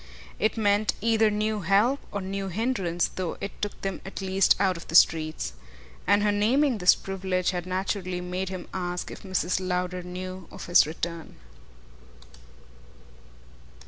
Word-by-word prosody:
It 215 +2 +1
meant 205 -1 +2
either 225 0 +3
new 210 +1 -1
help 205 - +3
or 200 - -3
new 195 +1 -3
hindrance, 190 -4 0
though 185 -3 -4
it 200 - -7
took 205 - -3
them 195 -1 -3
at 195 - -7
least 190 -1 +3
out 190 -2 +2
of 170 - -9
the 165 - -4
streets. 155 - +4 0.5
And 205 +2 +4
her 210 - +3
naming 235 +5 +2
this 180 0 +6
privilege 190 -2 -1
had 180 -1 -4
naturally 185 -1 -2
made 180 +1 -3
him 185 -2 -6
ask 180 -1 -3
if - - -9
Mrs. 185 -2 0
Lowder 180 0 -2
knew 185 0 -7
of - - -9
his 175 -3 +5
return. 165 +1 -5
190 Hz, 150 wpm, -26 LUFS, 180-205 Hz, 0.5 s, this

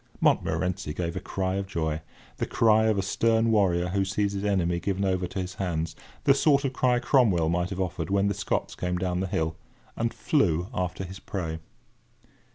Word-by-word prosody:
Montmorency 90 -4 +1
gave 85 -2 -3
a - - -1
cry 95 0 -2
of 100 0 -3
joy—the 80 -4 -4
cry 110 -1 +4
of 110 -2 +2
a 95 - +1
stern 115 +3 +2
warrior 90 -5 +2
who 95 +2 +1
sees 100 +1 0
his 100 0 -3
enemy 90 -4 +1
given 100 +1 -1
over 95 -1 0
to 95 - -5
his 90 0 -4
hands—the 80 - -1
sort 140 0 +3
of 135 - -1
cry 125 -1 +2
Cromwell 115 - +3
might 90 +1 0
have 95 -1 -5
uttered 90 -2 -2
when 100 0 +2
the 100 - +1
Scots 100 - -2
came 90 0 -2
down 90 0 -1
the 95 - -1
hill—and 90 +6 -4
flew 90 - +1
after 90 -1 -2
his 95 +2 -8
prey. 80 -6 -4
95 Hz, 180 wpm, -27 LUFS, 85-105 Hz, -, cry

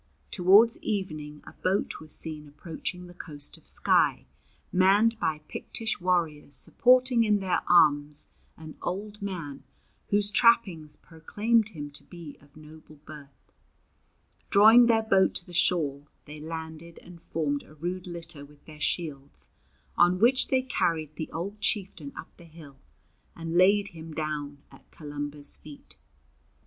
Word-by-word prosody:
Towards 205 +5 +5
evening 155 -8 -5
a - - -12
boat 190 +2 -2
was 155 -1 -9
seen 155 -2 -1
approaching 165 +4 -7
the 175 - -13
coast 145 -4 -9
of - - -18
Skye, - - +2 0.5
manned 205 +5 +3
by 155 -7 -2
Pictish 225 -4 -4
warriors 165 -6 0
supporting 250 - +5
in 210 -2 +2
their 190 -2 -1
arms 150 -3 +3 0.3
an 155 -1 -11
old 205 +3 -5
man 170 -8 -6 0.4
whose 205 0 +2
trappings 190 -10 +2
proclaimed 215 +7 -1
him 145 -7 -8
to 145 - -11
be 170 -4 -11
of 145 +1 -21
noble 155 0 -15
birth. 145 -2 -15 1.0
Drawing 225 +4 +7
their 225 -1 +3
boat 195 -3 +2
to 175 - -4
the 175 - -14
shore, 150 -5 0 0.2
they 150 +1 -10
landed 160 +1 -8
and 175 -1 -14
formed 145 -3 -2
a 155 - -18
rude 180 +4 -5
litter 170 -4 -6
with 145 0 -18
their 155 -1 -14
shields, 140 - -4 0.5
on 175 +1 +4
which 245 +6 +3
they 260 -1 +1
carried 160 - -2
the 160 - -6
old 200 +5 -6
chieftain 190 -9 -2
up - - -10
the 170 - -15
hill 155 -4 -15 0.6
and 165 0 -5
laid 200 +3 +4
him 160 -3 -11
down 145 -2 -5
at - - -19
Columba's 145 -1 -1
feet. 150 -2 -14
165 Hz, 145 wpm, -27 LUFS, 150-200 Hz, 1.0 s, Drawing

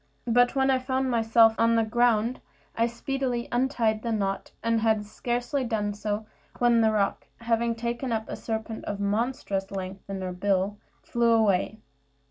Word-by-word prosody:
But 245 +2 +3
when 270 0 +3
I 260 - +2
found 260 0 -1
myself 225 -1 +5
on 230 0 +4
the 225 - +3
ground, 235 +1 +1 0.3
I 230 +1 +2
speedily 245 0 -2
untied 240 -4 +1
the 235 - -2
knot, 195 -3 -2
and 230 -1 +1
had 220 -2 +2
scarcely 245 +5 -2
done 215 -4 -1
so, 210 +1 -3 0.3
when 240 -1 +4
the 220 -1 +4
roc, 205 -2 0
having 230 0 +1
taken 235 +2 -3
up 220 -1 -1
a - - -5
serpent 220 0 -4
of 205 -1 -4
monstrous 205 -2 -1
length 195 0 -6
in 195 -1 -4
her 185 -1 -3
bill, 195 +2 0 0.2
flew 235 -1 +1
away. 215 -1 +2
225 Hz, 165 wpm, -27 LUFS, 210-240 Hz, 0.3 s, myself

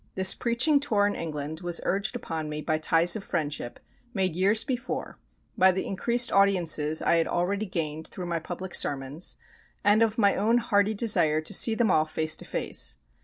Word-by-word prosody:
This 190 0 +5
preaching 255 +5 +2
tour 215 -8 +1
in 205 - 0
England 155 -1 -6
was 175 -1 -1
urged 200 +6 -1
upon 160 -9 -5
me 150 0 -6
by 155 -1 -1
ties 165 +2 +3
of 215 - -6
friendship, 145 -9 -4 0.4
made 185 -4 -1
years 200 +5 +3
before, 250 -3 -5 0.4
by 190 0 +4
the 190 +1 -4
increased 235 +5 0
audiences 170 -6 +2
I 170 - +2
had 165 - 0
already 200 +4 -2
gained 160 -3 -4
through 180 - -8
my 170 -1 -3
public 175 +3 -8
sermons, 140 +4 0 0.5
and 205 +2 +3
of 225 -1 +1
my 200 -3 +3
own 225 +4 +1
hearty 215 -3 0
desire 160 -8 +2
to 155 - -5
see 225 - +5
them 220 -4 +1
all 155 -2 +2
face 155 0 -1
to - - -12
face. - - -1
185 Hz, 185 wpm, -26 LUFS, 160-215 Hz, 0.5 s, This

